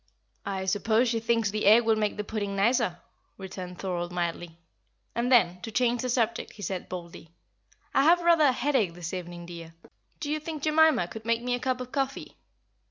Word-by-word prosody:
"I 190 -1 -3
suppose 220 +5 +2
she 230 -1 0
thinks 230 -2 +1
the 215 -1 -1
egg 225 +3 +7
will 225 -1 +4
make 210 -1 -1
the 210 - -2
pudding 205 -2 -3
nicer," 210 -2 +2 0.4
returned 185 -2 -8
Thorold, 175 -2 -3
mildly; 170 -1 -3 0.6
and 240 +2 -1
then, 180 -7 +4
to 225 - -6
change 245 +1 +1
the 255 - -2
subject, 230 -2 -1
he 205 - -10
said, 190 -1 -4
boldly, 170 -2 -8 0.6
"I - - +4
have 345 +2 +6
rather 335 -3 +5
a 275 - +5
headache 245 -9 0
this 175 0 -6
evening, 175 -1 -6
dear. 165 -1 -10 0.4
Do 295 -1 -3
you 310 - 0
think 305 -1 -6
Jemima 310 - +4
could 220 +4 -9
make 230 +1 0
me 250 0 -1
a 245 - -1
cup 255 0 -1
of 250 0 -7
coffee?" 275 -1 -3
220 Hz, 195 wpm, -27 LUFS, 180-250 Hz, 0.6 s, egg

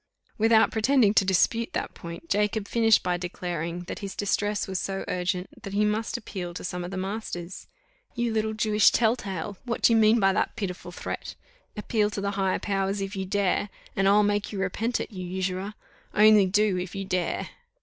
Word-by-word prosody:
Without 225 0 +5
pretending 225 -1 +3
to 205 - +5
dispute 195 +5 +1
that - - -3
point, 170 - -9
Jacob 210 -3 0
finished 225 -2 +4
by 180 -1 0
declaring, 175 -1 -4
that 175 - -7
his 195 -1 -6
distress 205 0 0
was 190 -1 -2
so 195 0 -3
urgent 180 0 -2
that 195 - -7
he 210 +1 +2
must 215 +3 -1
appeal 185 -6 -6
to - - -6
some 180 0 -4
of 175 - -5
the 190 - -5
masters. 190 -2 -5 0.5
"You 235 -1 -1
little 220 0 0
Jewish 215 -1 +4
tell 225 0 +3
tale, 195 -3 -5
what 240 -2 -4
do 230 - +6
you - - +5
mean 220 +1 +5
by 195 -2 +4
that - - -1
pitiful 180 -3 -5
threat? - - -6 0.4
Appeal 210 0 +1
to 205 -1 -4
the 200 0 -1
higher 195 -2 0
powers 195 0 -1
if 195 +1 -4
you 190 0 -3
dare, 200 0 0 0.3
and 195 0 +2
I'll 205 +1 +5
make 205 0 0
you 205 - -5
repent 215 +5 -1
it, - - -5
you 185 -3 -6
usurer! 185 +2 -3 0.4
Only 210 -2 +6
do, 205 0 +2
if 180 0 -6
you 195 0 -3
dare!" 185 -2 -1
200 Hz, 200 wpm, -26 LUFS, 185-215 Hz, 0.5 s, do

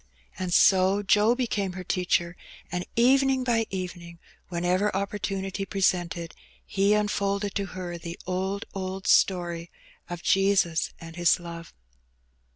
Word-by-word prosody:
And 185 -1 -3
so 190 +3 +4
Joe 210 +4 +4
became 210 -7 -1
her 185 0 -6
teacher, 175 -1 0 0.4
and 180 0 -2
evening 265 +2 +4
by 230 -3 +1
evening, 175 -2 -6 0.3
whenever 180 +3 +1
opportunity 195 -1 -3
presented, 175 -4 -1 0.3
he 200 +1 +2
unfolded 200 -1 0
to 200 -1 -2
her 175 -2 -5
the 170 +1 -7
'^old, 190 +2 -2
old 190 0 -5
story 175 -2 +2 0.4
of 175 -1 -6
Jesus 195 -5 +2
and 165 0 -10
His 175 0 +4
love. 170 -1 -9
190 Hz, 125 wpm, -26 LUFS, 175-200 Hz, 0.4 s, so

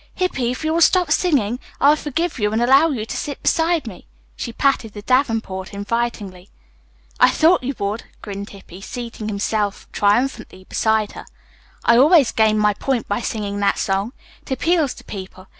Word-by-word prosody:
"Hippy, 270 -10 -1
if 250 +5 -4
you 315 0 0
will 335 - +1
stop 355 -1 +4
singing, 260 - +1 0.2
I'll 290 +2 +5
forgive 310 +1 -3
you 210 -1 +1
and 220 - 0
allow 270 +7 +5
you 235 -8 -3
to - - -6
sit 285 - -4
beside 330 -2 +1
me." 205 -6 -10 0.3
She 235 - -5
patted 230 -4 0
the 205 - -9
davenport 225 -7 0
invitingly. 205 -3 -3 0.7
"I - - +7
thought 335 +3 +3
you 265 +2 -3
would," 205 +3 -3
grinned 200 -1 -7
Hippy, 195 -2 -13
seating 230 0 -7
himself 205 0 -2
triumphantly 220 -1 0
beside 220 -1 +1
her. - - -10 0.6
"I 235 - +5
always 295 -1 +5
gain 220 -1 +3
my 210 -1 +3
point 255 +2 -2
by 205 +4 -1
singing 205 -3 -3
that 200 - +1
song. 195 +5 -1 0.3
It - - -17
appeals 310 +1 +1
to - - -13
people. 185 -2 -9
230 Hz, 175 wpm, -20 LUFS, 205-275 Hz, 0.7 s, I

